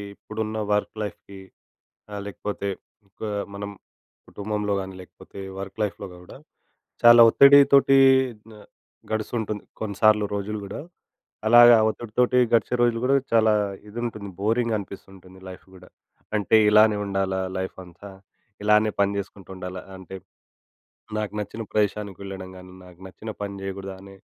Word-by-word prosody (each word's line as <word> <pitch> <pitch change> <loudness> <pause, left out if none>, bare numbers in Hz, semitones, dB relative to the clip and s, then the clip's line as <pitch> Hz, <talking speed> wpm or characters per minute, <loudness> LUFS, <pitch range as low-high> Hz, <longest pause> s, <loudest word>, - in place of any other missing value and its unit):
ఇప్పుడున్న 110 +1 -5 0.2
వర్క్ 105 +1 -1
లైఫ్‌కి 100 -1 -9 0.7
ఆహ్, 100 -1 -5
లేకపోతే 100 0 -5 0.4
ఇంకా 105 +2 -7 0.3
మనం 100 0 -6 0.6
కుటుంబంలో 105 0 -3
కానీ 95 0 -8
లేకపోతే, 90 - -14 0.2
వర్క్ 95 +2 -8
లైఫ్‌లో 100 -1 -4 0.2
కూడా - - -13 0.7
చాలా 120 0 +9
ఒత్తిడితోటి 140 +1 +6 0.5
న - - -13 0.6
గడుస్తుంటుంది 110 -1 -3 0.2
కొన్నిసార్లు 105 0 +2
రోజులు 105 +1 -4
కూడా. 100 - -7 0.7
అలాగా 120 +1 +8
ఒత్తిడితోటి 120 +3 0 0.2
గడిచే 115 +1 +2
రోజులు 120 -1 +2
కూడా 135 +2 +3 0.2
చాలా 110 -1 +4 0.4
ఇది 105 - -11
ఉంటుంది 105 -4 -6
బోరింగా 115 +2 0
అనిపిస్తుంటుంది 95 -1 -12
లైఫ్ 90 - -12
కూడా. 90 0 -16 0.5
అంటే 105 +1 +2
ఇలానే 105 0 +5
ఉండాలా 95 -1 -1 0.2
లైఫ్ 95 0 -4
అంతా? 90 +3 -13 0.5
ఇలానే 105 +1 +3
పని 100 0 +1
చేసుకుంటూ 100 -1 -8
ఉండాలా? 90 0 -7 0.2
అంటే 95 0 -10 1.0
నాకు 105 -1 -3
నచ్చిన 105 +2 -6
ప్రదేశానికి 105 -2 -1
వెళ్ళడం 95 -1 -8
కాని, 90 0 -13
నాకు 90 -1 -16
నచ్చిన 105 +5 -9
పని 100 0 -4
చేయకూడదా 95 0 -6
అనే, 100 0 -13
105 Hz, 130 wpm, -24 LUFS, 95-110 Hz, 1.0 s, చాలా